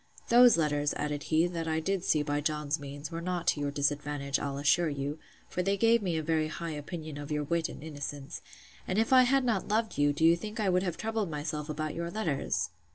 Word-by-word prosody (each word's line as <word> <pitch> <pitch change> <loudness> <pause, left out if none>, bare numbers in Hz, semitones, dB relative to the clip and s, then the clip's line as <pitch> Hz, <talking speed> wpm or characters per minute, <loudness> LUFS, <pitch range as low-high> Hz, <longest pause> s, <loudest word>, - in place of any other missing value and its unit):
Those 240 -3 +7
letters, 145 -2 +1
added 150 -1 -2
he, 160 +1 +4
that 170 -2 -3
I 160 0 +1
did 190 +2 -1
see 150 -4 +2
by 145 0 -1
John's 150 0 -1
means, 145 +3 -7
were 165 0 -4
not 175 -1 -2
to - - +1
your 145 0 -1
disadvantage, 145 -1 -1
I'll 140 -1 -3
assure 150 +4 +3
you; 145 +1 -4 0.3
for 180 - -2
they 195 +2 +1
gave 230 +2 +4
me 175 -5 -1
a 160 - -2
very 155 0 +1
high 165 +1 -5
opinion 155 0 -6
of 145 +1 -7
your 150 0 0
wit 165 +2 0
and - - -9
innocence: 145 -1 -6 0.5
And 185 - -1
if 225 +4 +2
I 255 - +9
had 270 +1 +3
not 215 -7 0
loved 220 -4 0
you, 145 0 +4
do 150 +3 +1
you 165 +1 +7
think 210 +6 -7
I 205 -3 +2
would 180 0 +3
have 180 -3 -2
troubled 220 -3 -2
myself 150 0 -4
about 155 0 -3
your 170 0 -3
letters? 140 - -1
155 Hz, 230 wpm, -30 LUFS, 145-180 Hz, 0.5 s, I